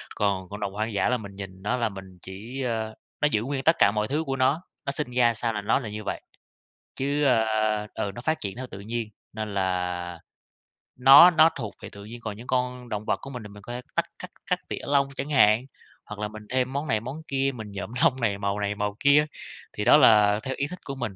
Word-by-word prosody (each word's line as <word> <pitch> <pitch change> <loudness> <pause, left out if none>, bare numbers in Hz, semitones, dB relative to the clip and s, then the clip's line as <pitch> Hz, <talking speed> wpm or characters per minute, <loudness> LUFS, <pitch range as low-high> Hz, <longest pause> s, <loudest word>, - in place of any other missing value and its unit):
còn 95 -3 0
cộng 105 +1 -7
đồng 100 -1 -3
hoang 110 +1 -2
dã 100 - +1
là 125 - +2
mình 100 -3 -9
nhìn 95 -1 -9
nó 125 +4 0
là 115 -2 0
mình 95 -2 -11
chỉ, 110 +8 -7
ơ 110 -3 -2 0.3
nó 150 - +5
giữ 105 - +2
nguyên 135 +1 -3
tất 160 - +5
cả 100 - +6
mọi 105 0 -1
thứ 150 +5 -1
của 135 -3 -2
nó, 135 +5 +2 0.2
nó 140 - -1
sinh 140 -3 -4
ra 120 -1 +3
sao 115 +1 -2
là 105 - -3
nó 105 - +2
là 115 -6 -6
như 105 0 -6
vậy. - - -4 0.8
Chứ, 140 +2 0
ơ, 110 -4 +2
ừ, 100 - -2
nó 120 - -7
phát 155 +5 -1
triển 100 0 -5
theo 130 - -5
tự 95 - -8
nhiên, 115 +2 -4 0.2
nên 110 -1 -5
là 90 -2 -2 0.8
nó 135 +7 +9
nó 160 0 +6
thuộc 110 -6 -5
về - - -8
tự 100 0 -11
nhiên 115 +3 -9
còn 105 -2 -5
những 120 +3 -11
con 125 -1 -1
động 105 -1 -4
vật - - +1
của 135 - -8
mình 125 -4 -7
thì 105 - -8
mình 105 0 -13
có 120 - -7
thể 125 - -5
tắt - - +2
cắt - - -8 0.2
cắt - - +1
tỉa - - -3
lông 140 -1 +3
chẳng 145 - -4
hạn, 115 -3 +4 0.4
hoặc 105 0 -8
là 105 - -1
mình 110 0 -10
thêm 130 +1 0
món 145 +2 -2
này 110 -5 +1
món 130 +8 -7
kia, 135 0 0
mình 110 -4 -8
nhuộm 100 +2 -6
lông - - +5
này, 105 -4 +1
màu 100 0 -2
này 105 0 -1
màu 105 0 -2
kia, 145 +2 +5 0.5
thì 105 - -3
đó - - +8
là 105 -6 +6
theo 130 0 -3
ý 140 - -1
thích 180 +3 -8
của 140 - -5
mình, 120 -7 -4
110 Hz, 255 wpm, -26 LUFS, 105-130 Hz, 0.8 s, nó